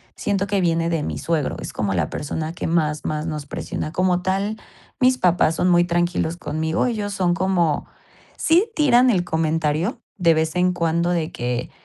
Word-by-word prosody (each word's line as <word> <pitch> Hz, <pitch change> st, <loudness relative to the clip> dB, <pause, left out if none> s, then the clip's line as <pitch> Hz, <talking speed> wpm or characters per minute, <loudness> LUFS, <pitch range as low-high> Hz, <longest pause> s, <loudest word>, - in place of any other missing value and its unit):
siento 200 Hz, -1 st, -1 dB
que 200 Hz, -1 st, 0 dB
viene 165 Hz, -1 st, +1 dB
de 165 Hz, -3 st, -1 dB
mi -, -, -3 dB
suegro, 160 Hz, -4 st, -1 dB
es -, -, -7 dB
como 100 Hz, -2 st, -1 dB
la 85 Hz, -5 st, 0 dB
persona 155 Hz, +2 st, -4 dB
que -, -, -4 dB
más 155 Hz, -3 st, 0 dB
más 155 Hz, 0 st, -2 dB
nos 150 Hz, -2 st, -4 dB
presiona. 155 Hz, -, -4 dB
Como 180 Hz, -1 st, +1 dB
tal, 195 Hz, +4 st, -1 dB, 0.4 s
mis 255 Hz, 0 st, +4 dB
papás 175 Hz, -5 st, +2 dB
son 180 Hz, -, +1 dB
muy 175 Hz, -1 st, +5 dB
tranquilos 175 Hz, -1 st, 0 dB
conmigo, 160 Hz, 0 st, -1 dB
ellos 210 Hz, -4 st, -2 dB
son 180 Hz, -3 st, +1 dB
como 175 Hz, -4 st, 0 dB, 0.5 s
sí 355 Hz, +8 st, +3 dB
tiran 255 Hz, -4 st, +5 dB
el 180 Hz, -4 st, +1 dB
comentario 160 Hz, -, 0 dB, 0.2 s
de 170 Hz, -4 st, +4 dB
vez 160 Hz, +1 st, 0 dB
en 180 Hz, 0 st, +2 dB
cuando 170 Hz, 0 st, 0 dB
de 165 Hz, -3 st, -1 dB
que 120 Hz, 0 st, -3 dB
170 Hz, 180 wpm, -22 LUFS, 160-190 Hz, 0.5 s, muy